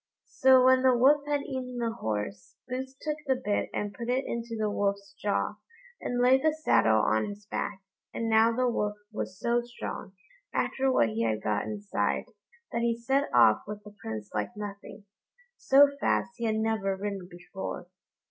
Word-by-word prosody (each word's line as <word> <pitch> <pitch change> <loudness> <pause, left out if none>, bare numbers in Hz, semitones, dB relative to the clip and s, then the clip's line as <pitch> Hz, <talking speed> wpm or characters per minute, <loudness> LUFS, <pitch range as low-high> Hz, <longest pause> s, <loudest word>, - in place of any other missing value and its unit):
So 260 -1 +5
when 260 0 +6
the 255 -1 +4
Wolf 285 +4 +4
had 290 -1 +1
eaten 255 -2 -5
the 235 -1 -1
horse, 105 - -4
Boots 260 +1 -5
took 300 0 -3
the 265 - +3
bit 210 -5 -1
and 205 -1 -3
put 235 +4 -6
it 255 +2 +1
into 235 0 -4
the 215 -1 0
Wolf's 200 -1 -1
jaw, 205 +1 -1 0.4
and 245 - -2
laid 255 +2 +5
the 310 +1 +2
saddle 110 - +4
on 110 0 +2
his 205 0 -9
back; 200 -1 -4 0.3
and 230 - -3
now 225 +1 +5
the 250 +2 +1
Wolf 210 -3 -1 0.2
was 185 -3 -5
so 235 0 +1
strong, 240 -5 -7 0.4
after 265 0 +1
what 115 - +3
he 110 +1 -2
had 110 -1 0
got 105 -1 0
inside, 105 -1 -2 0.5
that 235 - -1
he 235 0 +1
set 270 +4 0
off 115 -3 +5
with 210 0 -7
the 210 0 -12
Prince 110 -2 -6
like 235 - -3
nothing. 205 0 -8 0.5
So 280 +2 +6
fast 240 - +1
he 235 - -3
had 220 -1 +1
never 220 -3 0
ridden 195 -2 -4
before. 175 +1 -7
220 Hz, 180 wpm, -28 LUFS, 195-250 Hz, 0.5 s, when